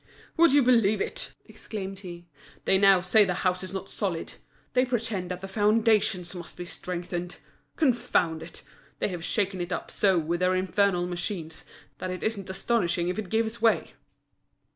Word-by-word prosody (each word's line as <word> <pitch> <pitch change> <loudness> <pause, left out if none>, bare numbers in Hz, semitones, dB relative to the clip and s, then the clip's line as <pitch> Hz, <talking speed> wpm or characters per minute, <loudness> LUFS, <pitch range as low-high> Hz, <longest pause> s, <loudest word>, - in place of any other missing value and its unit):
"Would 335 -2 +6
you 285 0 +5
believe 230 -4 +4
it!" - - -4
exclaimed 195 -3 -7
he, 175 -3 -9 0.4
"they 190 - +4
now 195 -2 +6
say 195 +4 +5
the 180 -3 0
house 185 0 +1
is 185 - -4
not 195 0 -5
solid; 185 -6 -3 0.4
they 250 0 +4
pretend 230 -7 -2
that 180 0 -5
the 195 - -5
foundations 210 -3 +2
must 175 -2 -9
be 175 - -5
strengthened. 175 0 -5 0.4
Confound 235 - +1
it! 165 +1 -9 0.3
they - - 0
have 175 -3 -5
shaken 195 -1 0
it 175 - -4
up - - -4
so 195 -3 +3
with 170 +1 -1
their 185 0 +2
infernal 185 0 +1
machines, 175 -2 -4 0.4
that 185 - -4
it 185 0 -5
isn't 205 -4 -2
astonishing 185 -4 0
if 180 - -2
it 205 -4 -5
gives 225 +1 -1
way!" 225 -1 +2
190 Hz, 170 wpm, -27 LUFS, 180-215 Hz, 0.4 s, Would